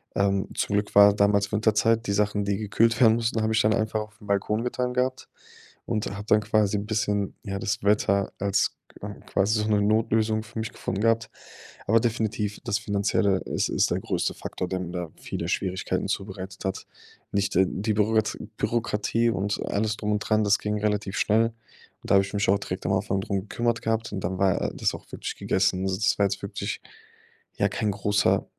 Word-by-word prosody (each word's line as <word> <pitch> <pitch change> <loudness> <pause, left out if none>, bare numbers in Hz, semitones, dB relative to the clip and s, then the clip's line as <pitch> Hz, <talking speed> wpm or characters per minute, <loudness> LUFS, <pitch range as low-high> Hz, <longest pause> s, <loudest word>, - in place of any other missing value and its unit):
Ähm, 100 -1 +1
zum 100 - -1
Glück 105 0 -1
war 100 0 +8
damals 100 0 +2
Winterzeit. 110 +2 +2
Die 100 - 0
Sachen, 105 0 +1
die 100 -1 0
gekühlt 115 +3 +2
werden 110 -2 +7
mussten, 115 0 0
habe 110 0 +1
ich 110 - +4
dann 110 +1 +3
einfach 110 0 0
auf 105 0 -10
den 105 - -14
Balkon 105 +3 0
getan 125 0 -2
gehabt. 130 +1 -1 0.6
Und 110 -2 -1
hatte 105 +1 -8
dann 105 - +2
quasi 105 -1 +2
'n 100 - -3
bisschen, 105 -2 -1
ja, 100 -2 -4
das 105 +3 -2
Wetter 100 -1 +2
als 100 0 +1 0.3
q - - -6 0.2
quasi 105 +2 +1
so 105 - -1
'ne 105 -1 +3
Notlösung 110 +1 +2
für 110 +1 -11
mich 110 - -3
gefunden 95 - -3
gehabt. 115 -1 +2 0.6
Aber 115 +2 +5
definitiv 110 -3 -1
das 110 -3 0
Finanzielle, 100 -2 +1
es - - -1
ist - - +1
der - - +1
größte - - -1
Faktor, 90 - -5
der 95 0 -2
mir 90 -2 -5
da 85 -3 -4
viele - - -5
Schwierigkeiten 95 -1 -1
zubereitet 95 -1 -5
hat. 95 - -3 0.5
Nicht 100 0 0
die 95 +4 +1
Bürokrat 110 +1 +1 0.2
Bürokratie 115 0 0
und 100 -2 -1
alles 105 +1 0
drum 105 -1 -2
und 105 - +1
dran, 110 0 +1
das 100 0 +4
ging 105 0 -2
relativ 105 -1 -1
schnell. 115 +2 +2 0.5
Und - - -6
da - - +7
habe 95 - +6
ich 100 - -10
mich 100 -1 0
auch 100 +1 +4
direkt 95 -1 -5
am 95 - +1
Anfang 95 0 0
darum 100 0 -2
gekümmert 115 +3 -1
gehabt 115 -1 -1
und 95 - -3
dann 95 +2 -2
war, 95 -2 +2
äh, - - -1
das - - 0
auch - - -11
wirklich - - -5
gegessen. 95 0 +1
Also, 95 -1 0
das 105 - +2
war 100 - +5
jetzt 100 0 -2
wirklich, - - -4 0.8
ja, - - +2
kein 105 - -1
großer, 100 0 +1
105 Hz, 205 wpm, -26 LUFS, 100-110 Hz, 0.8 s, war